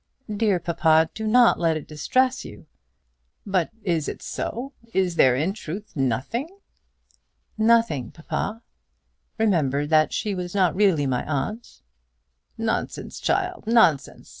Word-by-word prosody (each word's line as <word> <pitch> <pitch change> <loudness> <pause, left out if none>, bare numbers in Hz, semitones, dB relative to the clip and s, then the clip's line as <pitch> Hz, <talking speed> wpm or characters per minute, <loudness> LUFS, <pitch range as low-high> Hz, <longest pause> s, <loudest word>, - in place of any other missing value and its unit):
"Dear 205 -3 +2
papa, 160 -1 +2
do 220 0 -4
not 240 +2 +5
let 165 -2 +2
this 155 - -5
distress 255 - 0
you." - - -11 0.8
"But 190 -5 0
is 170 -6 0
it - - -6
so? 265 +4 -5 0.2
Is 185 -2 +2
there 130 -6 +5
in 160 +9 0
truth 205 0 -8
nothing?" 135 - -1 1.1
"Nothing, 220 - +2
papa. 205 +7 -4 0.7
Remember 155 - +1
that 155 0 +3
she 210 - -2
was 180 0 -5
not 185 -5 +3
really 185 -7 +3
my 130 -2 -1
aunt." 185 - -4 0.7
"Nonsense, 225 0 -3
child; 365 -5 -1
nonsense! 220 - +2
185 Hz, 125 wpm, -24 LUFS, 155-225 Hz, 1.1 s, not